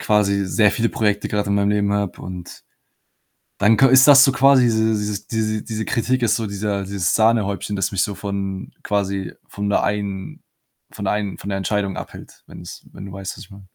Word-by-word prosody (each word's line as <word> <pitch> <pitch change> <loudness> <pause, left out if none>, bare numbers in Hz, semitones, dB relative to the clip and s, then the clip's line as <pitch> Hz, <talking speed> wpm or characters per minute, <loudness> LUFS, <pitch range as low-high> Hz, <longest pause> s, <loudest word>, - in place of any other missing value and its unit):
quasi 100 -2 +1
sehr 105 +2 +3
viele 115 -1 0
Projekte 105 -2 -1
gerade 105 -1 -2
in 100 - +2
meinem 100 0 +1
Leben 100 -1 +1
habe 100 -2 -2
und 90 -1 -9 0.9
dann 105 +2 +4
ka 135 - +6
ist 130 +1 +6
das 140 -2 +9
so 135 - +4
quasi 135 0 +5
diese 110 -1 +2 0.4
dieses 110 -2 -2
diese 110 -1 -4
Kritik 125 +2 0
ist 115 -1 +2
so 115 - -2
dieser 100 0 -3
dieses 95 -2 -1
Sahnehäubchen, 105 -3 +1
das 95 -2 -1
mich 100 - +1
so 105 - -3
von 100 -1 -5
quasi 100 -2 -2
von 100 0 -5
der - - +1
einen 100 -2 -4 0.5
von 100 - -7
der 95 - +1
einen 105 -2 -3
von 100 - -7
der 95 - -2
Entscheidung 100 0 -2
abhält, - - -10
wenn - - -11
es - - -11
wenn 95 - -9
du - - -10
weißt, 95 -1 -6
was 110 - -10
ich - - -27
meine? 100 0 -13
100 Hz, 210 wpm, -20 LUFS, 100-110 Hz, 0.9 s, das